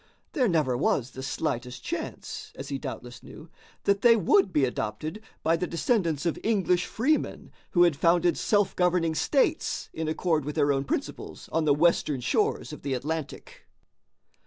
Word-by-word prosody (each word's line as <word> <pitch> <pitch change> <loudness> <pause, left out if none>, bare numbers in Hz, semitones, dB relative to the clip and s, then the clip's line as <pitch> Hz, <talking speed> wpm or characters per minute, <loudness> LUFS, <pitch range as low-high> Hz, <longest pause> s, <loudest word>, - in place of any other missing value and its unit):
There 260 -5 +2
never 155 - +1
was 125 0 0
the 130 - -8
slightest 130 -3 -3
chance, 430 +6 -5
as - - -7
he - - -3
doubtless - - -7
knew, - - -13 0.3
that 200 0 +2
they 235 -1 +7
would 195 -1 +3
be 145 -5 +3
adopted 155 - -4 0.2
by 165 +1 +3
the 180 +2 -2
descendants 170 - 0
of 170 - -1
English 190 -5 +1
freemen 295 +7 -1 0.2
who 175 - +6
had 170 -4 +4
founded 170 +3 +3
self 205 -2 +1
governing 180 -2 +2
states 270 - 0
in 160 0 -3
accord 160 -1 0
with 150 +2 -5
their 145 -2 +3
own 135 0 -1
principles - - -5
on 165 -1 +1
the 145 -2 +4
western 155 -3 +2
shores 120 - 0
of - - -9
the 135 -1 -2
Atlantic. 150 +2 -5
165 Hz, 165 wpm, -27 LUFS, 145-190 Hz, 0.3 s, they